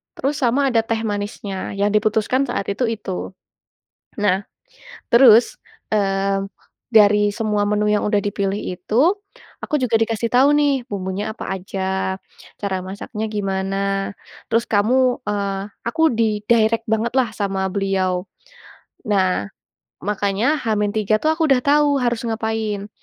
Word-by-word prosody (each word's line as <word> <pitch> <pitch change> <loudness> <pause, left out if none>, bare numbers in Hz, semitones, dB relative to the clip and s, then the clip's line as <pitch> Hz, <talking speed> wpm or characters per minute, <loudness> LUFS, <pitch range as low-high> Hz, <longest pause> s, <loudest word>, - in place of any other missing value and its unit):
terus 280 +2 -1
sama 270 +3 +2
ada 230 - +3
teh 225 -1 -1
manisnya, 205 -1 -4
yang 205 +1 +2
diputuskan 215 +5 +2
saat 200 - -2
itu, 205 +6 -2
itu. 220 -3 -5 1.1
Nah 190 -2 +3 0.8
terus, 235 -1 +6 0.4
eee, 195 -1 +1 0.5
dari 210 -1 +5
semua 210 -1 -1
menu 210 0 +1
yang 210 0 +2
udah 210 - +2
dipilih 200 -1 -1 0.2
itu, 180 +4 -7 0.7
aku - - -4
juga 235 -3 +2
dikasih 225 0 -1
tahu 260 +3 +6
nih 290 -1 +3 0.2
bumbunya 195 0 -3
apa - - -6
aja, 190 0 -3 0.4
cara 200 -2 -1
masaknya 205 +3 -6
gimana, 195 -1 -2 0.7
terus 230 +1 +1
kamu, 250 +5 +3
eee, 200 -1 -2 0.2
aku 320 +7 -1 0.2
di-direct 220 +1 +2
bangetlah 235 +3 +1
sama 195 -2 -1
beliau. 190 -2 0 0.8
Nah, 190 - +1 0.6
makanya 205 +8 0
H-3 215 -1 +1
tuh 310 - +2
aku 320 0 0
udah 260 -2 +4
tahu 285 -1 +3
harus 240 -2 0
ngapain. 220 -2 -2
210 Hz, 125 wpm, -20 LUFS, 195-230 Hz, 1.1 s, terus